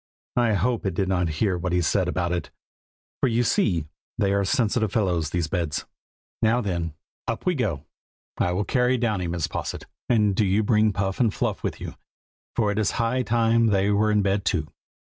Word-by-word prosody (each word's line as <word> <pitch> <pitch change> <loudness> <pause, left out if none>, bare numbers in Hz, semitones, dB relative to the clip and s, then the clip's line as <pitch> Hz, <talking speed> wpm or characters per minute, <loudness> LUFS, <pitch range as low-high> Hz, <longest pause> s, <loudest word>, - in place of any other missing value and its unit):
I 120 -3 +3
hope 105 +3 0
it 95 - -2
did 95 0 0
not 90 -3 +1
hear 95 -1 +1
what 90 0 -2
he 90 - +3
said 90 +2 +1
about 90 -1 -1
it, 85 -4 -2 0.7
for - - +2
you 120 +1 +2
see 85 -8 +1 0.3
they 100 -3 +2
are 100 0 +2
sensitive 110 +1 +1
fellows, 90 -8 0
these 90 -2 -1
beds. 80 -3 -2 0.6
Now 115 +2 +3
then, 85 -8 -2 0.3
up 115 - -3
we 180 - +3
go! 85 - -2 0.5
I 90 - +2
will 100 +4 0
carry 125 0 +2
Downy, 105 -7 0
Mrs. 85 -2 -2
Posset, - - -4 0.2
and 105 -4 +3
do 110 - +2
you 100 +2 +2
bring 110 0 +3
Puff 95 -1 -2
and 115 -4 +3
Fluff - - -2
with - - -3
you, - - -6 0.6
for 105 -3 +2
it 105 - -1
is 105 - +2
high 120 +2 +1
time 115 -1 +2
that 105 - +2
they 100 +1 +2
were 105 +1 +3
in 105 -1 +3
bed 100 0 +1
too." 80 -4 0
100 Hz, 200 wpm, -25 LUFS, 90-115 Hz, 0.7 s, I